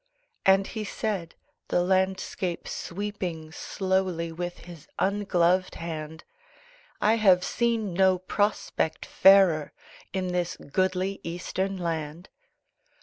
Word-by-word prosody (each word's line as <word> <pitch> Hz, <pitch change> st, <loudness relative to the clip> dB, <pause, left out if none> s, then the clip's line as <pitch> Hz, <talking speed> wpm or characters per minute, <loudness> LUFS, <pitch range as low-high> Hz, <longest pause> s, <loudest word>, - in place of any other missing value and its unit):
And 195 Hz, 0 st, +6 dB
he 220 Hz, +1 st, -5 dB
said, 200 Hz, -5 st, -3 dB, 0.3 s
the 175 Hz, -, +2 dB
landscape 190 Hz, -1 st, -1 dB
sweeping 175 Hz, -4 st, -5 dB
Slowly 185 Hz, -2 st, -1 dB
with 175 Hz, +2 st, -5 dB
his 165 Hz, -4 st, -12 dB
ungloved 185 Hz, -2 st, +2 dB
hand 160 Hz, -1 st, -6 dB, 0.8 s
"I 220 Hz, +2 st, +3 dB
have 190 Hz, -5 st, +5 dB
seen 230 Hz, -5 st, 0 dB
no 190 Hz, +1 st, +4 dB
prospect 195 Hz, -3 st, -1 dB
fairer 190 Hz, -6 st, +5 dB, 0.4 s
In 185 Hz, -1 st, -2 dB
this 180 Hz, -1 st, -1 dB
goodly 185 Hz, +5 st, -1 dB
Eastern 185 Hz, +3 st, -3 dB
land." 165 Hz, -1 st, -4 dB
185 Hz, 100 wpm, -27 LUFS, 170-195 Hz, 0.8 s, And